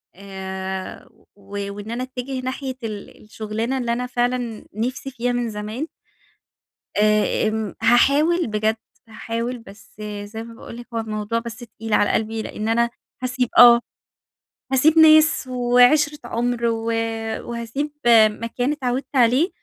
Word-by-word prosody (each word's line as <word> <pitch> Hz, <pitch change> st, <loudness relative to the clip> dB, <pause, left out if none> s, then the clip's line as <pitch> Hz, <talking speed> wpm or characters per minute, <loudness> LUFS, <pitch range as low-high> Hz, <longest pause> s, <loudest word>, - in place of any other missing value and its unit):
آآ، 190 Hz, 0 st, -6 dB, 0.3 s
و 200 Hz, 0 st, -6 dB
وإن 205 Hz, +2 st, -7 dB
أنا 240 Hz, +2 st, -3 dB
أتجه 255 Hz, +1 st, -5 dB
ناحية 260 Hz, +1 st, -4 dB
ال 210 Hz, -2 st, -7 dB
الشغلانة 220 Hz, +4 st, -3 dB
اللي 240 Hz, -2 st, -1 dB
أنا 250 Hz, +1 st, -2 dB
فعلًا 245 Hz, -2 st, -2 dB
نفسي 255 Hz, +5 st, -3 dB
فيها 245 Hz, 0 st, -1 dB
من 245 Hz, -1 st, -1 dB
زمان. 215 Hz, +8 st, -5 dB, 1.1 s
آآ، 215 Hz, 0 st, +2 dB
آمم، 220 Hz, -2 st, -3 dB
هاحاول 290 Hz, +8 st, +4 dB
بجد، 215 Hz, +1 st, 0 dB, 0.3 s
هاحاول 230 Hz, +2 st, -4 dB
بس 200 Hz, -3 st, -16 dB, 0.3 s
زي 220 Hz, +2 st, -7 dB
ما 230 Hz, 0 st, -11 dB
باقول 230 Hz, -, -10 dB
لِك 240 Hz, -, -10 dB
هو 230 Hz, -, -1 dB
الموضوع 215 Hz, +1 st, -2 dB
بس 230 Hz, -1 st, -7 dB
تقيل 225 Hz, -2 st, -7 dB
على 205 Hz, -, +3 dB
قلبي 220 Hz, 0 st, -1 dB
لأن 215 Hz, 0 st, -5 dB
أنا 235 Hz, +1 st, +2 dB, 0.3 s
هاسيب 250 Hz, -1 st, -1 dB
آه، 240 Hz, -1 st, +9 dB, 0.9 s
هاسيب 300 Hz, +5 st, +4 dB
ناس 310 Hz, -3 st, +6 dB
وعِشرة 250 Hz, +4 st, +3 dB
عُمر، 240 Hz, 0 st, -1 dB
و 225 Hz, -1 st, -1 dB, 0.6 s
وهاسيب 235 Hz, +6 st, -3 dB, 0.4 s
مكان 230 Hz, +5 st, -3 dB
إتعودت 265 Hz, -1 st, -3 dB
عليه، 255 Hz, -, +4 dB
235 Hz, 135 wpm, -22 LUFS, 215-255 Hz, 1.1 s, آه